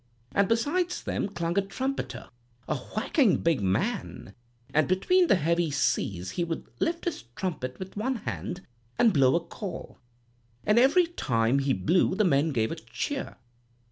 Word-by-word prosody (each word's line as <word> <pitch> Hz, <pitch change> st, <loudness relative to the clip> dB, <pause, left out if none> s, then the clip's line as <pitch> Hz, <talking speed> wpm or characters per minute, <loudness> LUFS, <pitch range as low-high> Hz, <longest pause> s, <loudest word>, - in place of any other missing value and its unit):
And 200 Hz, 0 st, +2 dB
beside 290 Hz, +11 st, +1 dB
them 355 Hz, -, -3 dB
clung 170 Hz, 0 st, -1 dB
a -, -, +3 dB
trumpeter, 260 Hz, +8 st, -4 dB, 0.4 s
a 155 Hz, -, 0 dB
whacking 215 Hz, -, +1 dB
big 165 Hz, -7 st, +1 dB
man, 105 Hz, -, -2 dB, 0.4 s
an' 155 Hz, 0 st, +3 dB
between 350 Hz, -, +3 dB
the -, -, +5 dB
heavy 170 Hz, 0 st, +1 dB
seas 95 Hz, -9 st, 0 dB
he 175 Hz, -, -1 dB
would 165 Hz, -1 st, -4 dB
lift 335 Hz, 0 st, -1 dB
his 340 Hz, -, -3 dB
trumpet 155 Hz, -9 st, -3 dB
with 190 Hz, 0 st, -8 dB
one 250 Hz, +6 st, -1 dB
hand, 190 Hz, -4 st, -5 dB, 0.3 s
and 230 Hz, -4 st, +5 dB
blow 135 Hz, -1 st, +4 dB
a -, -, +4 dB
call; 180 Hz, +1 st, -7 dB, 0.7 s
and 210 Hz, +3 st, +5 dB
every 285 Hz, +8 st, +5 dB
time 125 Hz, -, +1 dB
he 135 Hz, -1 st, +1 dB
blew 170 Hz, -, +2 dB
the 215 Hz, +1 st, +2 dB
men 150 Hz, -1 st, +3 dB
gave 115 Hz, -6 st, 0 dB
a 165 Hz, -, -4 dB
cheer. 280 Hz, -, -4 dB
185 Hz, 160 wpm, -27 LUFS, 145-235 Hz, 0.7 s, the